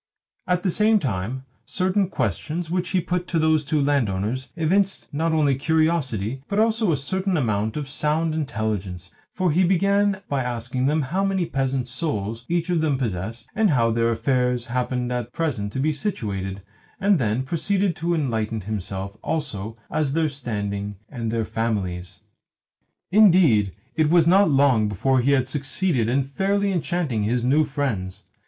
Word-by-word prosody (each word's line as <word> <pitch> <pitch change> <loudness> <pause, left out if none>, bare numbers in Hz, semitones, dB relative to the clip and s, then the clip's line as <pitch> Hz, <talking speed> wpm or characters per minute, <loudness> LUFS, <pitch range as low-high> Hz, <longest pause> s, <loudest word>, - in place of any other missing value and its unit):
At 180 0 +1
the 185 - +2
same 215 +4 +4
time, 125 - -3 0.2
certain 185 0 0
questions 155 - -2
which 180 0 -1
he 190 - +2
put 180 +1 -2
to 170 - -1
those 160 -1 +3
two 150 +2 0
landowners 130 -3 0
evinced 185 +3 0
not 160 +3 0
only 150 -3 +3
curiosity, 135 - 0
but 200 - -2
also 220 -3 +2
a 150 - +1
certain 185 +6 -1
amount 110 -4 0
of 145 -2 -3
sound 155 +3 0
intelligence; 110 - -3 0.2
for 185 -3 0
he 180 +5 +3
began 195 +2 +2
by 140 -2 0
asking 125 +2 -2
how 155 +5 0
many 195 -2 +1
peasant 135 -3 -1
souls 115 -5 -3
each 170 +1 0
of 170 -2 +2
them 150 -4 +1
possessed, 115 0 -4
and 215 -1 +3
how 115 -6 +3
their 115 0 +2
affairs 125 +1 0
happened 125 0 -2
at 120 -1 -3
present 120 -11 -2
to - - -3
be 155 +3 +1
situated, 100 - -3 0.4
and 200 -3 +3
then 115 +1 0
proceeded 185 +5 0
to 170 +1 0
enlighten 115 -7 -1
himself 100 0 -5
also 115 -9 -3
as 150 -3 0
their 160 0 +1
standing 105 -7 -4
and 120 -5 -4
their 115 0 -1
families. 100 -6 -3 0.9
Indeed, 175 - +5 0.2
it 155 -2 +2
was 170 0 +5
not 195 +3 +5
long 135 -6 +4
before 130 +6 +1
he 135 +3 +3
had 130 -2 +2
succeeded 140 - 0
in 135 +3 +2
fairly 195 +8 0
enchanting 170 - -1
his 115 +3 0
new 140 +5 +4
friends. 130 -11 -3
135 Hz, 160 wpm, -23 LUFS, 115-170 Hz, 0.9 s, Indeed